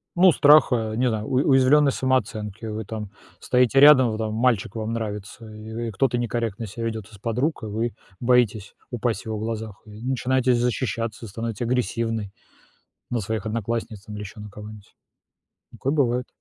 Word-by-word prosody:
Ну, 180 0 +7
страха, 130 -8 +5
не 125 +2 +1
знаю, 110 -1 -3
у - - -4 0.2
уязвленной 140 +2 +5
самооценки. 110 -5 -1
Вы 110 -1 -4
там 105 -2 -6 0.3
стоите 125 +1 +3
рядом, 140 -4 +8
вот 110 - -3
там 110 -1 -2
мальчик 115 -3 +1
вам 110 0 -3
нравится, 110 0 -5
и, 110 +2 -6
э, - - -6
кто-то 120 +4 +1
некорректно 115 -2 -2
себя 115 +3 -6
ведёт 110 -2 -5
из 105 - -13
подруг, 125 +7 -1
и - - -3
вы 115 +2 -2 0.3
боитесь 115 -5 +1
упасть 120 -1 -2
в - - -26
его 110 -1 -3
глазах, 110 -1 -5
и - - -15
вы 105 +1 -11
начинаете 130 0 +1
защищаться, 115 -2 -2
становитесь 115 +2 -5
агрессивной 115 -4 -1 0.8
на 120 - -1
своих 110 0 -3
одноклассниц 110 -1 -3
там 105 -1 -9
или 105 - -6
еще 105 +2 -9
на 105 0 -8
кого-нибудь. 105 0 -12 0.8
Такое 135 - -2
бывает, 125 -4 +1
115 Hz, 170 wpm, -24 LUFS, 110-125 Hz, 0.8 s, рядом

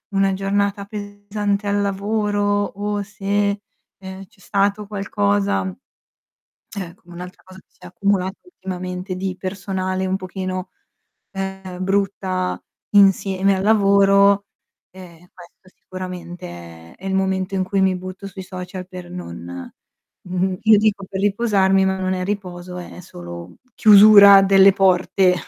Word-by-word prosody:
una 195 0 +2
giornata 200 +1 -1
pesante 205 0 -4
al 205 0 +1
lavoro 205 +1 -1 0.2
o 205 +1 -3
se, 200 0 -1 0.4
ehm, 190 0 -9
c'è 210 -3 -29
stato 200 +2 0
qualcosa, 100 - 0
mhmm 95 - -5 1.0
eh, 180 -3 -6
come 175 -2 -17
un'altra 180 +1 -10
cosa 185 0 -15
che - - -35
si - - -35
è - - -10
accumulata 190 +1 -1
ultimamente 185 - -6
di 190 0 -3
personale 190 -1 -3
un 190 +1 0
pochino, 185 0 -5 0.6
uhm, 190 -1 -6
brutta 190 -2 -1 0.3
insieme 195 -1 +3
al 190 - -2
lavoro, 200 -1 +4 0.5
uhm, 180 -3 -13 0.2
questo 180 +1 -17
sicuramente 130 - -9
è 195 - -11
il 190 - -1
momento 190 0 -1
in 190 - 0
cui 195 +1 -1
mi 190 -1 +2
butto 185 +2 -8
sui 190 -1 -8
social 185 0 -8
per 180 -1 -10
non 180 - -7 0.9
n 185 0 -1
io 220 -2 +6
dico 205 -2 +1
per 190 0 -4
riposarmi, 195 -2 +2
ma 190 0 0
non 185 0 -1
è 185 0 -3
riposo, 180 -2 -5
è 180 - -10
solo 85 - -10 0.2
chiusura 200 -2 +8
delle 195 0 +6
porte 185 -1 +3
190 Hz, 135 wpm, -20 LUFS, 185-200 Hz, 1.0 s, chiusura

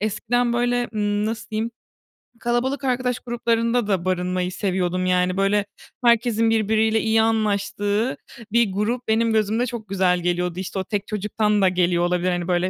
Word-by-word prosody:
eskiden, 235 +3 0
böyle, 245 0 +1 0.2
ııı 205 0 0
-nasıl 220 0 -5
diyeyim 220 +2 -2 0.7
kalabalık 255 +4 -1
arkadaş 250 -1 0
gruplarında 235 -1 0
da 185 -3 0
barınmayı 180 0 -1
seviyordum. 185 -2 -1
Yani, 180 0 +1
böyle, 200 +1 +2 0.4
herkesin 230 -1 +3
birbiriyle 220 0 +2
iyi 220 0 +3
anlaştığı 210 +1 0 0.3
bir 235 -4 +3
grup 225 +5 -2
benim 225 +1 +2
gözümde 220 +3 +1
çok 230 -4 -6
güzel 185 -2 +2
geliyordu, 180 0 -1
işte, 190 +1 -4
o - - -1
tek 205 +1 -3
çocuktan 210 0 0
da 190 - +5
geliyor 175 -1 +1
olabilir. 180 +1 0
Hani, 175 -1 -2
böyle, 180 0 +1
210 Hz, 155 wpm, -22 LUFS, 185-230 Hz, 0.7 s, da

